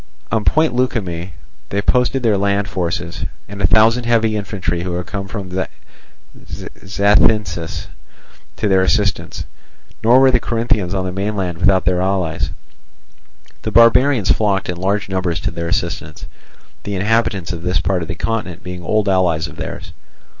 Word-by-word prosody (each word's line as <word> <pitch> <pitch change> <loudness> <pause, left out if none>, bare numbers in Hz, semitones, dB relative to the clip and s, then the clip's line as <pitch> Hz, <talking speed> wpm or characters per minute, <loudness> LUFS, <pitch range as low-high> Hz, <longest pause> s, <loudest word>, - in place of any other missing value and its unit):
On 110 -1 +1
Point 155 +1 +3
Leukimme 95 -9 -2 0.4
they 100 - -1
posted 125 +2 +2
their 110 -3 +3
land 100 +1 +1
forces, 85 -2 -3 0.2
and 100 0 -7
a 90 - +5
thousand 115 +4 +4
heavy 115 -2 +2
infantry 95 -5 -2
who 90 0 -3
had 90 0 -3
come 95 +2 -5
from 95 -2 -6 0.9
Zacynthus 100 -3 0 0.7
to 110 - -1
their 95 -1 +4
assistance. 100 +1 0 0.6
Nor 120 +3 +6
were 135 0 +6
the 125 - +3
Corinthians 110 -6 -1
on 95 -1 -1
the 90 - -3
mainland 95 -2 -2
without 95 0 +3
their 90 0 +2
allies. 85 -7 0 1.1
The - - -3
barbarians 115 -1 +5
flocked 100 -4 +1
in 90 - -3
large 100 +3 -1
numbers 95 -3 -1
to 95 - -2
their 85 0 -4
assistance, 80 -3 -3 0.6
the 100 - -4
inhabitants 100 -3 0
of 85 - -6
this 90 +1 0
part 95 -2 0
of 80 - -4
the 85 - -4
continent 105 -4 -3
being 90 0 -6
old 105 +4 +1
allies 90 -4 +2
of - - -12
theirs. - - -7
95 Hz, 155 wpm, -18 LUFS, 90-110 Hz, 1.1 s, Nor